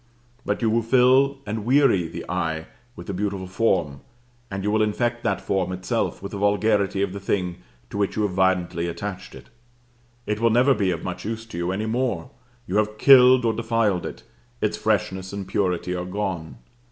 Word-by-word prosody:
But - - -2
you 115 - +3
will 115 +1 +2
fill 130 +4 +4
and 105 0 -3
weary 125 - +3
the 80 - -8
eye 80 -3 -2 0.3
with - - -9
the 100 - -4
beautiful 100 0 -2
form, 90 -8 0 0.5
and 95 0 -4
you 105 - 0
will 110 0 +2
infect 120 +3 0
that 100 - 0
form 95 -2 -1
itself 90 +1 -2
with 100 - -6
the 100 - -5
vulgarity 100 -1 +2
of 95 -2 -2
the 100 - -5
thing 90 -2 -2 0.3
to 100 - -4
which 100 - 0
you 110 - 0
have 105 - 0
violently 90 -2 +1
attached 100 +3 -6
it. - - -13 0.8
It 105 0 -2
will 115 0 +3
never 125 +5 +4
be 100 -5 0
of 85 -2 -2
much 90 0 -5
use 115 +1 -4
to 115 - -11
you 85 +1 -1
any 105 +3 -2
more; 115 -6 -2 0.3
you 95 - -1
have 105 0 0
killed 130 -1 +7
or 115 - +2
defiled 110 -5 0
it; - - -9 0.4
its 105 - 0
freshness 95 -3 -1
and 100 -2 -5
purity 90 -2 -1
are 90 0 -3
gone. 90 -7 -4
100 Hz, 195 wpm, -24 LUFS, 90-110 Hz, 0.8 s, killed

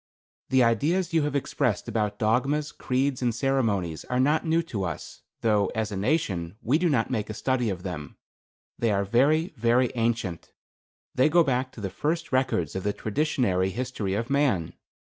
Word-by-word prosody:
The 130 -1 +4
ideas 160 - +1
you 165 - +4
have 145 -1 -2
expressed 135 -4 -1
about 105 -2 -1
dogmas, 135 +8 +1
creeds 130 +1 -1
and 120 -3 0
ceremonies 110 - 0
are 125 - -1
not 150 +4 +3
new 165 +1 +2
to 115 - -4
us, 85 -5 -6 0.2
though, 105 -3 +3
as 110 -1 -1
a - - -3
nation, 95 - -1
we 135 +8 +2
do 175 -1 +2
not 130 -4 +1
make 110 -5 -2
a 110 - -5
study 125 0 0
of 90 -3 -4
them. 80 -6 -6 0.6
They 115 - +2
are 100 -1 +1
very, 150 - +2
very 120 +2 +3
ancient. 115 -8 -2 0.6
They 130 +4 +3
go 170 +2 +5
back 130 -2 0
to 110 - -10
the 95 -2 -3
first 160 +2 -2
records 125 - 0
of 95 - -2
the 105 +2 -1
traditionary 110 -7 0
history 115 -3 -3
of 115 +5 -3
man. 130 - +1
120 Hz, 180 wpm, -26 LUFS, 100-140 Hz, 0.6 s, go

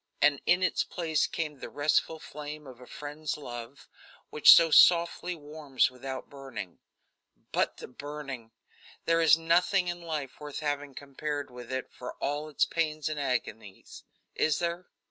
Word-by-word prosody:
And 145 -2 +4
in 180 +1 +4
its 185 - +2
place 160 -3 0
came 150 -4 -4
the - - -7
restful 150 +2 +1
flame 150 0 -8
of 130 -2 -12
a 125 - -12
friend's 150 +1 -5
love, 120 -2 -9 0.4
which 150 - +8
so 165 -1 +8
softly 170 +2 +5
warms 145 -4 -1
without 130 +1 -7
burning. 130 -10 -8 0.7
But - - 0
the - - -8
burning! 135 -3 -7 0.6
There 165 0 +3
is 160 -2 +6
nothing 175 +3 +2
in 175 0 -4
life 155 -6 -5
worth 150 0 -6
having 145 -2 -3
compared 145 0 -5
with 125 0 -10
it 130 0 -3
for 125 - -8
all 145 +2 -3
its 150 - +2
pains 155 -2 -1
and 155 -1 -3
agonies. 115 -7 -4 0.3
Is 155 -2 +1
there? 170 +1 -3
150 Hz, 155 wpm, -29 LUFS, 135-160 Hz, 0.7 s, which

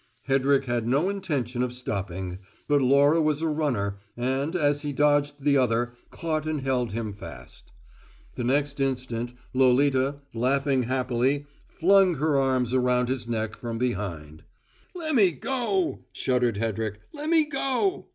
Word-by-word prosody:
Hedrick 135 0 +3
had 120 -2 -1
no 140 +9 +2
intention 140 - -2
of 125 -1 0
stopping, 95 -6 -4 0.3
but 145 -1 +3
Laura 140 +5 +4
was 155 -1 +1
a - - +2
runner, 125 -11 -1 0.2
and, 135 +6 -1
as 145 -4 +2
he 145 -1 -3
dodged 145 0 +1
the 140 -1 +4
other, 120 -1 +1 0.2
caught 155 -2 -3
and 155 -2 -1
held 125 -4 0
him 110 -1 -3
fast. 100 - -11 0.6
The 125 - -4
next 140 +3 0
instant, 125 -3 -2 0.2
Lolita, 130 +1 +3 0.2
laughing 135 +3 +1
happily, 130 +2 0 0.2
flung 190 0 +4
her 150 +1 +1
arms 130 -3 +1
round 125 -1 +2
his 130 -2 -2
neck 110 -2 -2
from 115 -1 -5
behind. 90 -11 -3 0.5
"Lemme 280 - +2
go!" 295 +7 -1
shuddered 125 -4 0
Hedrick. 110 -1 -2
"Lemme 310 +1 +2
go!" 280 +7 -1
135 Hz, 140 wpm, -26 LUFS, 120-150 Hz, 0.6 s, Laura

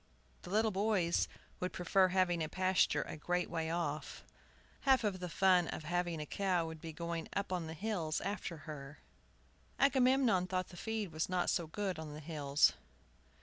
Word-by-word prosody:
The - - -10
little 215 +3 +2
boys 195 -3 +2 0.3
would 180 0 -2
prefer 185 +2 +3
having 180 -2 +2
the 155 -1 -2
pasture 185 +1 +2
a - - -7
great 180 +3 -1
way 165 -2 -1
off. 160 -3 -3 0.6
Half 265 -2 +4
the 185 -4 -2
fun 180 0 +4
of - - -5
having 175 0 -1
a 150 - -3
cow 180 0 0
would 160 -1 -7
be 165 - -6
going 170 +1 -4
up 200 -1 -2
on 175 -3 -2
the 160 - -6
hills 175 -5 -1
after 195 -4 -4
her. 145 -2 -8 0.8
Agamemnon 260 -8 +4
thought 185 0 -2
the 180 - -12
feed 220 -1 -3
was 155 +2 -2
not 180 -1 +1
so 170 - 0
good 190 0 -3
on 155 -2 -6
the - - -7
hills. 145 -2 +2
180 Hz, 175 wpm, -35 LUFS, 160-195 Hz, 0.8 s, Half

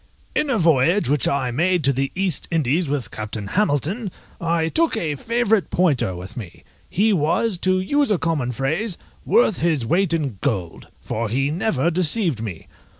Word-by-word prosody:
_ - - -35 0.4
In 300 - -4
a 255 - +2
voyage 165 - +3
which 145 -2 +3
I 135 -3 0
made 175 +6 +1
to 140 +1 +3
the 135 +1 -1
East 185 -5 -1
Indies 160 0 +1
with 140 -7 -2
Captain 110 -1 -5
Hamilton, 195 - 0 0.3
I 165 -1 +1
took 330 - +1
a 155 -3 -1
favourite 225 - 0
pointer 145 - +1
with 90 +2 -9
me; 105 -9 -9 0.3
he 210 +3 +2
was, 180 +4 +1
to 185 +1 +2
use 285 +9 +1
a 205 - +3
common 160 -7 -1
phrase, 160 - -2 0.3
worth 225 -5 +3
his 155 -7 +1
weight 180 +9 +1
in 140 - -2
gold, 95 - -3
for 115 0 -3
he 135 +5 0
never 170 -3 0
deceived 170 - 0
me. 100 -8 -6
160 Hz, 175 wpm, -22 LUFS, 130-185 Hz, 0.4 s, voyage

